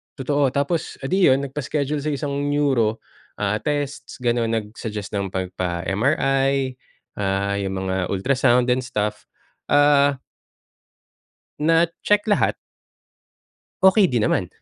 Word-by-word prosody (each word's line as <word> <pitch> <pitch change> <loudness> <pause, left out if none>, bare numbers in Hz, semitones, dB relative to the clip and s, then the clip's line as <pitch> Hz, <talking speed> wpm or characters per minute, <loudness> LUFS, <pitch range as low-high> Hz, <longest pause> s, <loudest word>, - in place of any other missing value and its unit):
totoo. 140 0 +1
Tapos 150 +4 -1
edi 185 +8 +2
yun 130 +1 +4
nagpa-schedule 145 +1 -2
sa 150 +1 -2
isang 140 0 -2
Neuro, 135 -7 +1 0.4
ah, 105 +1 +1
tests, 145 +1 -4
ganun. 120 -2 +1
Nag-suggest 105 -1 -4
ng 95 -1 -3
'pag 95 -1 -2
pa 85 -2 -2
MRI, 135 - +1 0.4
ah, 100 0 -1
yung 95 -1 -3
mga 95 -1 -1
ultrasound 125 +4 +2
and 125 +1 +1
stuff, 105 -4 -3 0.4
ah 145 -1 +4 1.4
Na-check 165 +6 +2
lahat. 205 - +2 1.3
Okey 190 +1 +6
din 120 -7 0
naman. - - +1
135 Hz, 115 wpm, -22 LUFS, 105-145 Hz, 1.4 s, Okey